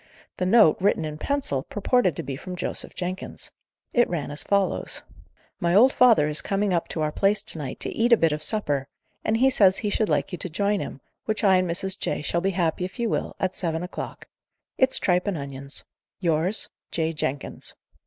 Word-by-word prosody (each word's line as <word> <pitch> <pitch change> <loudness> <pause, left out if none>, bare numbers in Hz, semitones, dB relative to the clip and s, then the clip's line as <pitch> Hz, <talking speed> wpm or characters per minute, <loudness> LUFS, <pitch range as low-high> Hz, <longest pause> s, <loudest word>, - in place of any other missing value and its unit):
The 180 - 0
note, 210 -6 +6
written 185 -4 +2
in 150 0 -6
pencil, 275 - -1
purported 205 - +1
to - - -3
be 135 0 -4
from 180 +6 -7
Joseph - - -5
Jenkins. 185 +1 -4 0.4
It 240 -1 +3
ran 160 -5 -3
as 145 - -1
follows: 200 -1 0 0.6
My 175 -2 +1
old 255 +6 +6
father 230 -12 +5
is 150 0 +1
coming 200 -1 0
up 170 - 0
to 160 - -4
our 150 - 0
place 200 +6 +2
to 160 - +2
night, 140 -4 -5
to - - -1
eat 235 +2 +1
a 235 - +8
bit 165 -4 +3
of 150 0 -2
supper, 145 -9 0 0.4
and 220 - +1
he 265 +3 +4
says 195 -6 +5
he 210 -2 -2
should 215 +1 +1
like 145 -2 0
you 180 - -5
to 185 - -3
join 200 +4 0
him, 135 - -6 0.2
which 215 0 -2
I 190 -2 +6
and 185 -1 0
Mrs. 190 +3 -2
J. - - -2
shall 170 +4 0
be 195 - +1
happy 175 -2 0
if 185 +5 -5
you 235 -2 0
will, - - -2
at 185 -1 0
seven 165 -2 -2
o'clock. 180 - -7 0.5
It's 260 0 +4
tripe 180 +1 +1
and 195 -4 0
onions. 140 0 -5 0.4
Yours, 175 +3 +1 0.2
"J. 165 0 -1
JENKINS." 145 -2 -4
180 Hz, 210 wpm, -25 LUFS, 155-205 Hz, 0.6 s, a